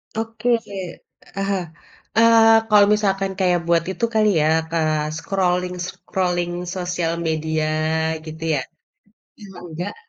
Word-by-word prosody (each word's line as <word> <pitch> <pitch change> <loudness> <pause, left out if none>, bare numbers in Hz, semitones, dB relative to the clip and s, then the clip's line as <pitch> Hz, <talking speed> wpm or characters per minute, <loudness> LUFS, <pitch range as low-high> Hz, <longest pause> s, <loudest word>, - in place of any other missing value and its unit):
Oke. 225 +1 -4 0.9
Ah 195 - -1
hah, 195 -2 0 0.5
eee, 225 0 +6 0.2
kalau 205 -1 +7
misalkan 195 -2 0
kayak 180 -2 +2
buat 170 -1 +3
itu 190 +5 -1
kali 215 -1 +4
ya, 150 - +2 0.3
eee, 155 -2 0
scrolling-scrolling 180 -1 -2 0.2
sosial 175 -2 -2
media 160 0 -1 0.6
gitu 160 0 -8
ya? 135 - -1 0.8
Eee, 205 - -11 0.2
enggak 175 +4 -5
180 Hz, 115 wpm, -21 LUFS, 165-200 Hz, 0.9 s, kalau